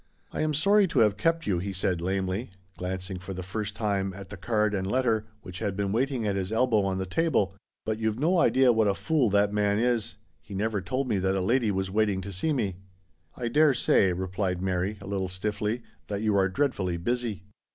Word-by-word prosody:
" - - -39
I - - -2
am 155 -1 +1
sorry 200 +6 +4
to - - 0
have 105 -3 +4
kept 165 +3 +1
you," 90 -4 +1
he 100 +3 -3
said 90 -2 -1
lamely, 95 +4 -1 0.3
glancing 95 +1 -4
for 95 +1 -7
the 95 - -5
first 100 +2 -4
time 100 -3 -1
at 100 -1 -9
the - - -7
card 105 +1 0
and 95 -1 -1
letter, 115 -3 +1 0.2
which 90 -1 -8
had 100 -2 -2
been 100 -1 -1
waiting 125 +1 0
at 100 -2 0
his 95 0 -2
elbow 115 -1 +3
on 95 -1 -1
the 95 - -2
table, 105 - +1 0.2
" 110 - -62
but 110 0 -2
you've 110 -1 0
no 170 +7 +2
idea 130 -6 +5
what 110 -1 +3
a 100 - +2
fool 150 -5 +1
that 100 +1 +2
man 105 -1 +2
is. 115 -2 0 0.3
He 100 - -9
never 105 0 -1
told 130 +6 -2
me 105 -5 +1
that 95 +1 +1
a - - +1
lady 115 +4 +2
was 95 -1 -1
waiting 105 -2 +1
to 100 +1 -7
see 95 - 0
me." 105 -10 -1 0.3
" 80 -2 -37
I 120 - -2
dare 145 +3 +4
say," 95 -5 +3
replied 95 0 -2
Mary 95 +2 -1
a - - -9
little 95 -1 -2
stiffly, 105 +5 -2
" - - -38
that 100 +1 -3
you 105 -2 +2
are 95 -1 +3
dreadfully 95 -7 0
busy." 115 0 -2
105 Hz, 235 wpm, -27 LUFS, 95-120 Hz, 0.3 s, idea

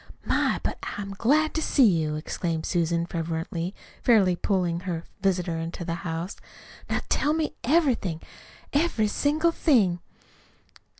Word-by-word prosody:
My, - - +1
but - - -2 0.2
I'm 200 -1 -5
glad 295 +10 +2
to 320 - -1
see 275 -4 +4
you!" 160 -7 +2
exclaimed 160 +1 -3
Susan 170 -1 +1
fervently, 165 +1 -3 0.3
fairly 200 -7 +4
pulling 175 -2 0
her 175 -2 -4 0.2
visitor 180 -4 +1
into 165 +1 -5
the 165 - -2
house. 165 +2 -4 0.5
"Now - - 0
tell 300 - +2
me 315 -1 -1
everything 250 - +2 0.5
every 285 -8 +2
single 305 +9 +2
thing." 215 - +3
185 Hz, 130 wpm, -26 LUFS, 170-255 Hz, 0.5 s, see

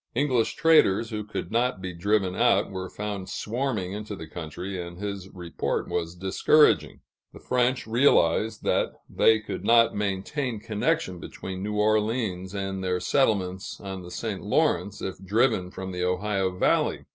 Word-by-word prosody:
English 125 -4 +1
traders, 120 -9 +4
who 105 -1 -3
could 105 -4 -6
not 120 -2 +1
be 95 -1 -5
driven 95 +1 0
out, 115 -4 +3
were 95 -1 -5
found 100 -2 -5
swarming 110 -5 -2
into 105 0 -5
the 80 - -8
country, 90 +4 -6
and 85 0 -8
his 100 -1 -5
report 90 -3 -3
was 85 0 -3
discouraging. 95 - +3 0.3
The - - -11
French 125 0 0
realized 110 -4 +3
that - - +1
they 110 0 +4
could 105 - -6
not 115 0 +5
maintain 105 +5 -2
connection 110 - -1
between 95 +3 -7
New 105 +1 -3
Orleans 105 -3 0
and 95 -1 -3
their 90 -1 0
settlements 100 -6 0
on 95 -1 -6
the 90 - -10
St. 100 +2 -4
Lawrence, 100 +1 0
if 95 0 -5
driven 105 -2 +2
from 95 +1 -6
the 90 0 -3
Ohio 95 +1 0
valley. - - +1
100 Hz, 155 wpm, -26 LUFS, 95-115 Hz, 0.3 s, not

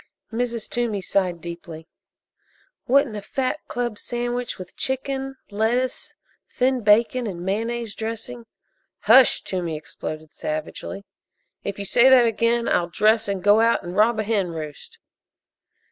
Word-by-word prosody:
Mrs. 235 -1 -2
Toomey 235 -4 -1
sighed 180 -3 0
deeply. 170 -2 -8 1.0
"Wouldn't 270 -3 +3
a 205 - -4
fat 260 +7 -2
club 240 -3 -3
sandwich 240 0 -3
with 185 -1 -10
chicken, 270 0 -3 0.2
lettuce, 240 +5 -1 0.4
thin 255 0 +2
bacon 230 +3 +3
and 175 -3 -6
mayonnaise 225 +2 -2
dressing 230 +2 -6 0.3
" - - -49
"Hush!" 250 +4 +6
Toomey 175 -4 -3
exploded 155 0 -7
savagely. 155 +5 -5 0.6
"If 200 - -4
you 200 - -4
say 240 +6 +5
that 255 -2 +7
again 230 +1 +1
I'll 175 0 +1
dress 215 +5 +3
and 195 -2 -2
go 205 +2 +6
out 230 0 +3
and 175 +1 -6
rob 220 +3 +4
a - - +1
hen 205 -3 0
roost!" 155 -3 -8
220 Hz, 140 wpm, -23 LUFS, 190-240 Hz, 1.0 s, that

